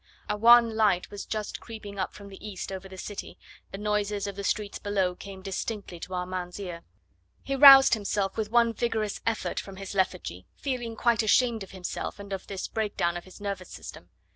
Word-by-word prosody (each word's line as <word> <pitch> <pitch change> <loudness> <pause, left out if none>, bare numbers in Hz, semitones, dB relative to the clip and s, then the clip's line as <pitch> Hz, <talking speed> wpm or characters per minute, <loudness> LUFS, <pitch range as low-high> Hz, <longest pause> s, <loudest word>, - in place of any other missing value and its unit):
A 210 - 0
wan 230 +1 +7
light 205 -5 +2
was 205 -1 -7
just 215 -1 -3
creeping 210 -3 -9
up 190 - -1
from 200 -1 -10
the 195 - -12
east 200 -3 -6
over 190 0 -6
the 190 - -10
city; 205 +2 -7 0.3
the 195 - -6
noises 210 -1 -1
of 200 -1 -4
the 200 - -5
streets 205 +1 -1
below 195 -3 0
came 190 +1 -10
distinctly 195 -2 -4
to 185 - -6
Armand's 180 0 -4
ear. 175 -4 -6 0.6
He 275 - -2
roused 270 -1 +10
himself 205 -2 0
with 215 -1 -2
one 235 0 +4
vigorous 220 -3 -1
effort 225 -1 -1
from 195 - -8
his 195 +1 -7
lethargy, 180 - -1
feeling 245 -4 -3
quite 235 0 +3
ashamed 225 +1 +3
of 195 - -7
himself 185 -2 -5
and 200 -1 -7
of 190 - -5
this 195 -2 -4
breakdown 205 -6 -1
of 175 - -6
his 185 - -14
nervous 200 -3 -4
system. - - -10
200 Hz, 195 wpm, -28 LUFS, 190-220 Hz, 0.6 s, roused